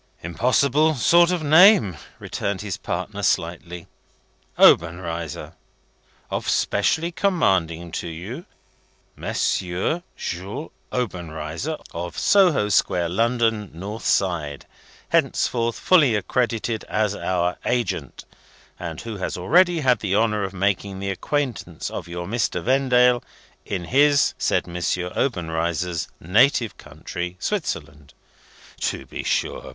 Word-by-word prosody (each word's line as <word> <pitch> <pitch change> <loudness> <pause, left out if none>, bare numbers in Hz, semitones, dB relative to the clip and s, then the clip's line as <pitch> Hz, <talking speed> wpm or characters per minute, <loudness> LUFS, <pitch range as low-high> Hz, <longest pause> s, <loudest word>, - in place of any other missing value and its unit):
"Impossible 135 - +2
sort 170 +7 +5
of 180 -3 -1
name," 155 - +6 0.2
returned 100 -1 -3
his 100 -4 -4
partner, 95 +3 -4
slightly 85 -1 -1 0.7
"Obenreizer. 85 -1 +2 0.4
' - - -35
Of - - -2
specially 155 - +1
commanding 95 - 0
to - - -4
you 95 - -7 0.7
M. - - -5
Jules 95 - -3 0.2
Obenreizer, 90 - -4 0.2
of 85 0 -5
Soho 180 - +4
Square, 90 -3 +2
London 115 +1 +1
(north 100 +6 -6
side), 80 -7 0 0.4
henceforth 115 -1 +1
fully 150 -11 +4
accredited 115 +1 -1
as 105 -1 0
our 90 -3 -1
agent, 120 -1 -2 0.5
and 85 -2 -6
who 115 -2 -6
has 95 - -3
already 170 - +3
had 125 -5 +3
the 100 -2 -1
honour 105 -1 +2
of 95 - -3
making 100 0 -1
the 100 0 -3
acquaintance 120 - -3
of - - -6
your 85 0 -5
Mr. 100 -4 -1
Vendale, 125 -1 +3 0.5
in 95 -3 -3
his 140 - +3
(said - - +1
M. 85 0 -6 0.4
Obenreizer's) 85 - -1
native 115 - +3
country, 90 0 -6
Switzerland.' 75 - -4 0.6
To - - -2
be - - -6
sure! - - -2
100 Hz, 115 wpm, -23 LUFS, 85-125 Hz, 0.7 s, name